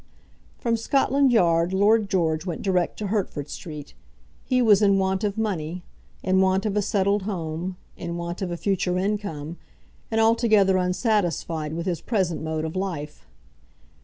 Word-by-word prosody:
From 230 -2 0
Scotland 275 +3 +2
Yard 170 -5 +3
Lord 205 +2 +3
George 160 -4 +1
went 175 -3 -5
direct 180 -3 0
to 210 - -4
Hertford 180 -8 -2
Street. 150 -3 -8 0.5
He 255 -1 +1
was 215 -4 +5
in 200 -1 +4
want 190 +1 0
of 205 0 -1
money, 180 -5 -2 0.4
in 190 0 +3
want 190 +1 +2
of 210 -2 -1
a 210 - +2
settled 200 0 +1
home, 180 -2 -4 0.2
in 170 -1 -5
want 170 +2 -5
of 190 - -2
a 175 - -3
future 180 -1 0
income, 185 -6 -3 0.5
and 225 - 0
altogether 220 -4 +4
unsatisfied 180 -5 0
with 170 +1 -4
his 175 -4 -2
present 190 -8 -1
mode 160 0 -2
of 160 - -5
life. 165 -6 -4
190 Hz, 160 wpm, -24 LUFS, 170-210 Hz, 0.5 s, was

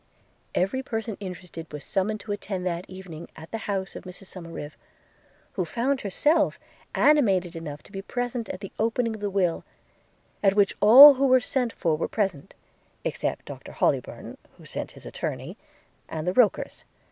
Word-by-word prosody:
Every 195 +9 +1
person 225 -4 -4
interested 180 -4 -8
was 150 -2 -7
summoned 210 +2 -1
to 210 - -6
attend 195 -2 -4
that 175 0 -3
evening 180 -4 -9
at 160 +1 -12
the 225 - -3
house 195 -1 -2
of - - -7
Mrs 185 +1 -10
Somerive, 165 -4 -7 0.8
who 185 - -1
found 240 - -1
herself 295 - +2 0.4
animated 195 - +3
enough 150 -3 -7
to - - -18
be 195 -1 -5
present 245 +2 -3
at 185 - -6
the 195 - -7
opening 230 +1 +1
of 215 - -8
the 205 - -1
will, 185 -4 0 0.8
at 195 -1 +4
which 205 -2 +3
all 265 +8 +11
who 275 +1 +2
were 255 0 +6
sent 250 0 -1
for 165 -7 0
were 155 - -2
present, 190 -10 -2 0.5
except - - -2
Doctor - - -9
Hollybourn - - -1 0.2
(who - - -15
sent - - -5
his - - -14
attorney) - - -5 0.5
and 155 -1 -4
the 180 - 0
Rokers. 240 -2 +2
195 Hz, 170 wpm, -26 LUFS, 180-230 Hz, 0.8 s, all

